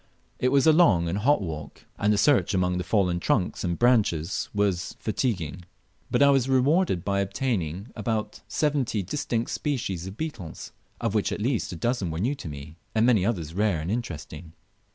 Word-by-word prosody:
It 125 - +2
was 140 -1 +4
a 160 - +7
long 105 - +4
and 90 +5 -1
hot 130 0 +3
walk, 75 -4 -7
and 105 - +2
the 105 - +2
search 120 -1 +3
among 90 -1 +1
the - - -2
fallen 90 -2 +1
trunks 90 +1 0
and 85 -2 -1
branches 105 -8 +2
was 100 -4 0
very - - -30
fatiguing, 90 - -2 0.5
but - - +3
I 140 - +6
was 135 -2 +2
rewarded 135 - +2
by 100 -1 +1
obtaining 100 - -2
about 110 -1 -3
seventy 135 -9 0
distinct 115 +2 -2
species 100 - -2
of 95 +3 -8
beetles, 115 - -6 0.3
of 115 -3 -1
which 105 -2 +1
at - - -3
least 115 0 -1
a - - -5
dozen 115 0 -1
were 80 - -4
new 115 - 0
to 110 - -7
me, 75 +3 -9 0.2
and 110 +1 +4
many 115 -7 +4
others 90 -7 -2
rare 100 -3 +1
and 80 +5 -3
interesting. 90 -7 -5
105 Hz, 190 wpm, -26 LUFS, 90-125 Hz, 0.5 s, a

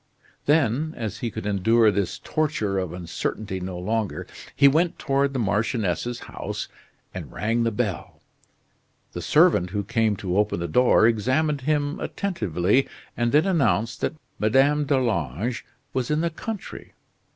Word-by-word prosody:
Then, 150 +1 +2
as 110 -4 -4
he 120 - -2
could 100 - -7
endure 110 +3 +3
this 100 -2 -1
torture 110 -11 -1
of 90 -3 -3
uncertainty 95 +3 -4
no 90 0 -5
longer, 100 -3 -2 0.3
he 140 - +6
went 165 +5 +2
toward 140 0 +1
the 135 - -3
marchioness's 110 0 -1
house - - -5 0.5
and - - -7
rang 115 +2 0
the 115 - +2
bell. 105 -6 -3 0.9
The - - -5
servant 90 - +4
who 100 +2 -2
came 110 +1 +1
to 95 0 -1
open 105 -3 +1
the 85 - -2
door 125 +5 +4
examined 130 +7 +1
him 145 +1 0
attentively, 115 - 0 0.3
and 120 0 0
then 150 +4 +4
announced 120 - +1
that - - -1 0.2
Madame 135 +7 +3
d'Arlange 115 - -1 0.3
was 130 -2 -1
in 150 +1 +1
the 170 0 0
country. 210 +4 -7
115 Hz, 145 wpm, -24 LUFS, 100-140 Hz, 0.9 s, he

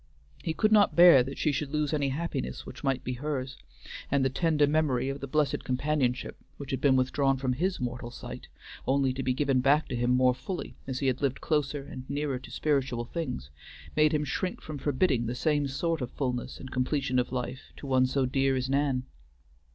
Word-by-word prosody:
He 160 - -3
could 215 +5 +2
not 210 -2 +5
bear 170 -6 +9
that 135 +2 -4
she 155 - +1
should 140 +1 -2
lose 150 0 0
any 145 -2 +1
happiness 135 - -3
which - - -10
might 135 -1 0
be 125 - -3
hers; 135 -3 -3 0.5
and 140 -1 +2
the 130 - +1
tender 155 0 +2
memory 140 -4 +1
of 135 +1 -4
the 140 - -4
blessed 150 0 0
companionship 130 -1 -1 0.2
which 140 -1 -7
had 130 -1 -2
been 140 -2 +4
withdrawn 135 +1 +2
from 130 -1 0
his 180 +8 -1
mortal 125 -1 -4
sight 120 - -9 0.4
only 135 -1 +2
to 135 - -4
be 130 -1 0
given 135 -2 +2
back 145 +4 +3
to 125 - -2
him 120 +1 0
more 125 0 +4
fully 180 +8 -6
as 130 -2 -3
he - - 0
had 130 0 +1
lived 135 -2 0
closer 150 -2 -1
and 130 -2 -9
nearer 140 -2 -1
to - - -12
spiritual 135 -5 0
things, 70 - -5 0.4
made 155 0 +4
him 150 -1 +1
shrink 180 +6 -2
from 150 -2 -7
forbidding 135 -4 +1
the 120 - -2
same 145 +1 +1
sort 160 +3 -1
of 125 - -3
fullness 125 -2 -3
and 130 - -9
completion 130 0 0
of 125 - -1
life 130 +1 -4
to - - -9
one 130 -1 +3
so 135 0 +1
dear 135 +1 +1
as 130 0 -1
Nan. 135 -2 +1
135 Hz, 210 wpm, -29 LUFS, 130-150 Hz, 0.5 s, bear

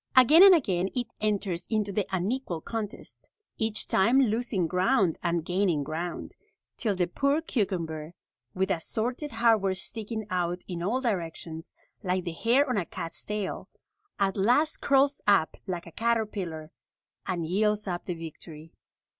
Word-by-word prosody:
Again 275 +7 +8
and 390 -1 +10
again 190 - 0
it 245 -2 -3
enters 200 -5 -1
into 215 -2 0
the 200 0 -1
unequal 190 0 -2
contest, 220 0 -7 0.3
each 220 -2 0
time 235 +8 +4
losing 225 -6 +1
ground 185 +1 +2
and 170 -2 -1
gaining 180 -5 +1
ground, 165 +4 -5 0.4
till 210 -4 -1
the 180 -1 +1
poor 280 - +1
cucumber, 175 - -3 0.4
with 190 +1 0
assorted 240 - -2
hardware 225 -5 +2
sticking 220 +3 -2
out 180 0 -1
in 175 -2 -5
all 225 +9 0
directions, 165 -7 -4 0.3
like 185 -2 -1
the 170 - -3
hair 240 - +2
on 250 -4 0
a 185 - 0
cat's 165 - -5
tail, 210 -2 -4 0.5
at 195 -1 0
last 250 +10 +2
curls 275 +1 +3
up 195 -6 +4
like 175 -2 -4
a 170 - -11
caterpillar 200 -8 -2 0.6
and 175 -3 -1
yields 210 +4 +1
up 175 -3 -4
the 180 - -3
victory. 160 -1 -10
195 Hz, 145 wpm, -28 LUFS, 175-230 Hz, 0.6 s, and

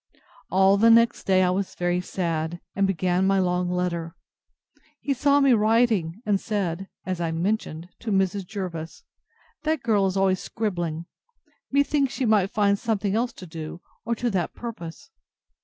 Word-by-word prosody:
All 190 +2 +4
the 225 +3 +5
next 230 +1 +4
day 185 -1 +4
I 180 - +3
was 190 +1 -2
very 175 0 0
sad, 170 -2 -2 0.2
and 195 0 +2
began 185 0 +1
my 195 0 +3
long 180 -1 +1
letter. 175 -2 -2 0.8
He 280 - -1
saw 280 +2 +3
me 275 -2 +5
writing, 215 -4 +2
and 200 -2 +1
said 195 -4 -2 0.2
(as 185 -2 -3
I 165 - 0
mentioned) 170 -1 -2
to 230 - -4
Mrs. 195 -1 0
Jervis, 175 -6 -6 0.6
That 310 -3 -1
girl 205 -4 +3
is 190 0 -2
always 190 -1 +2
scribbling; 175 -7 -3 0.7
methinks 280 -1 +2
she 265 - -1
might 210 -4 +3
find 200 -1 +2
something 210 -4 -1
else 235 +3 0
to 185 - -10
do, 160 0 -7 0.2
or 235 +1 -1
to 240 +1 -1
that 185 -3 -2
purpose. 230 - -8
195 Hz, 160 wpm, -25 LUFS, 175-225 Hz, 0.8 s, the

